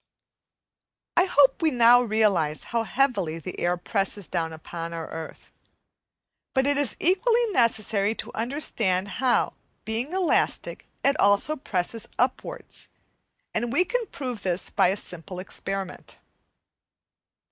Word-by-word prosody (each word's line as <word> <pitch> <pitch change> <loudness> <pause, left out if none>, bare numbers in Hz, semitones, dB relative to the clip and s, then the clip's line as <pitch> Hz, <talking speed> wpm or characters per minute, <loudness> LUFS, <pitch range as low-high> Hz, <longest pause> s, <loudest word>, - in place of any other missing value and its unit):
I 355 - +5
hope 285 -6 +4
we 325 - +4
now 245 -2 +6
realize 205 -9 +1
how 235 -1 -1
heavily 225 - 0
the 180 +3 -7
air 175 +1 +1
presses 195 +1 -1
down 165 -2 -2
upon 165 +1 -7
our 165 -1 -5
earth, 160 0 -8 1.0
but 265 0 +3
it 285 0 +3
is 285 -3 0
equally 455 +7 +3
necessary 220 - +2
to - - -6
understand 220 -7 0
how, 255 -2 +2 0.3
being 230 +7 -2
elastic, 370 -2 0 0.2
it 280 +2 +2
also 205 +10 +3
presses 225 -2 -2
upwards; 265 - -3 0.6
and 240 -1 -1
we 355 +8 +3
can 475 +4 -1
prove 250 -6 -5
this 185 -1 -1
by - - +3
a 190 +3 +1
simple 180 0 -5
experiment. 195 0 -5
225 Hz, 125 wpm, -25 LUFS, 185-275 Hz, 1.0 s, now